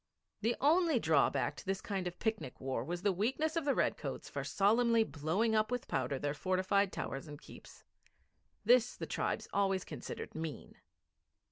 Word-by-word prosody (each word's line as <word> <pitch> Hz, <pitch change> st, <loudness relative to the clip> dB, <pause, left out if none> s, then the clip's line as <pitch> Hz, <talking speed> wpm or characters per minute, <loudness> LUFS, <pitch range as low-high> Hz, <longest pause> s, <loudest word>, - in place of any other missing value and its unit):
The 230 Hz, +3 st, +1 dB
only 320 Hz, +1 st, +4 dB
drawback 160 Hz, -10 st, +2 dB
to -, -, -10 dB
this 195 Hz, 0 st, 0 dB
kind 195 Hz, -4 st, -3 dB
of 175 Hz, 0 st, -6 dB
picnic 220 Hz, -, -3 dB
war 130 Hz, -3 st, -2 dB
was 175 Hz, +5 st, -4 dB
the 205 Hz, -, +4 dB
weakness 265 Hz, -, 0 dB
of 330 Hz, -3 st, 0 dB
the 280 Hz, -, +2 dB
redcoats -, -, -1 dB
for -, -, -4 dB
solemnly 230 Hz, +3 st, +3 dB
blowing 165 Hz, +8 st, 0 dB
up 215 Hz, 0 st, +2 dB
with 250 Hz, -1 st, -3 dB
powder 130 Hz, +1 st, -1 dB
their 145 Hz, +2 st, -2 dB
fortified 185 Hz, +4 st, +1 dB
towers 135 Hz, -1 st, -5 dB
and 145 Hz, -1 st, -9 dB
keeps. -, -, -14 dB, 0.8 s
This 245 Hz, +1 st, +5 dB
the -, -, -4 dB
tribes -, -, -2 dB
always 195 Hz, -2 st, +1 dB
considered -, -, -7 dB
mean. 160 Hz, -2 st, -6 dB
200 Hz, 165 wpm, -34 LUFS, 160-230 Hz, 0.8 s, This